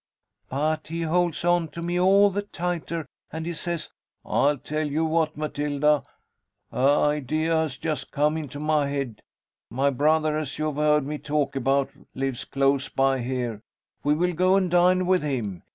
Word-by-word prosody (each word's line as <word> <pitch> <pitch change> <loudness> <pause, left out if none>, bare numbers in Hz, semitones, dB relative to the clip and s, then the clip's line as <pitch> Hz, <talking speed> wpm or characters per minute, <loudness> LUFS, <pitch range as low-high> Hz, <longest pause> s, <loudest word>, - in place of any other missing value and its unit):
But 155 +3 -1
he 165 +1 -3
holds 175 0 0
on 175 -1 +3
to 165 +3 -8
me 175 +1 -1
all 200 +2 +5
the 200 +2 -1
tighter, 175 -4 -3 0.2
and 160 +1 -5
he 170 - -3
says, 170 0 -3 0.3
'I 145 +1 +2
tell 155 0 -2
you 155 +3 0
what, 160 -1 0
Matilda, 150 -1 +1 0.7
a - - -14
idea 150 +3 +2
has 160 -4 0
just 155 -2 -3
come 150 +1 +1
into 145 -3 -5
my 150 -1 +1
head 140 -6 -4 0.5
'My 135 +3 +1
brother, 155 +3 +2
as 155 -1 -5
you 155 - -1
have 150 -2 -2
heard 150 -1 +3
me 150 +1 -4
talk 150 -2 -1
about, 135 +1 +1 0.2
lives 135 -1 -2
close 135 0 +1
by 135 0 +2
here, 120 -3 -3 0.4
we 145 +1 +3
will 180 +3 +1
go 185 +3 +3
and 185 -3 +1
dine 180 +1 +4
with 185 0 +3
him. 120 - -3
150 Hz, 170 wpm, -25 LUFS, 140-165 Hz, 0.7 s, all